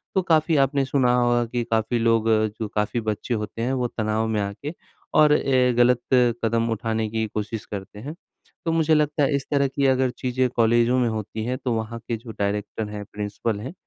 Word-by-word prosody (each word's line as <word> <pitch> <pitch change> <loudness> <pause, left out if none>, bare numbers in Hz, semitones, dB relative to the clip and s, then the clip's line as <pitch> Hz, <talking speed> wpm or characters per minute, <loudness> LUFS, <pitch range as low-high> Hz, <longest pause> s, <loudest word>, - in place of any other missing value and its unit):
तो 190 - +4
काफ़ी 160 -2 +2
आपने 140 0 0
सुना 130 -2 +2
होगा 120 -1 +2
कि 120 +1 -2
काफ़ी 110 +2 +1
लोग 115 -1 +2 0.3
जो 110 - -2
काफ़ी 105 +3 0
बच्चे 110 +2 -3
होते 110 +1 -4
हैं 130 +3 0
वो 125 -2 0
तनाव 110 0 -1
में 110 -2 0
आके 100 +11 -5 0.4
और 150 -1 +6
अ, 130 -4 +3
ग़लत 120 0 +4 0.4
कदम 115 +1 +1
उठाने 110 0 -1
की 110 0 -1
कोशिश 105 +1 -4
करते 100 0 -8
हैं। 145 +7 -7 0.5
तो 165 - +1
मुझे 160 -1 +2
लगता 150 -1 +2
है 140 +1 +2
इस 135 - -2
तरह 140 -1 +3
की 135 +1 -1
अगर 130 -1 +2
चीज़ें 130 0 0
कॉलेजों 120 +1 +3
में 120 - +2
होती 110 0 -4
हैं 125 +1 -2
तो 125 -2 -2
वहाँ 115 +1 -3
के 115 - -1
जो 115 +1 -10
डायरेक्टर 105 +1 -2
हैं 105 - -6
या 105 - -5
प्रिंसिपल 105 +1 -3
हैं, 130 - -7
120 Hz, 210 wpm, -24 LUFS, 110-130 Hz, 0.5 s, और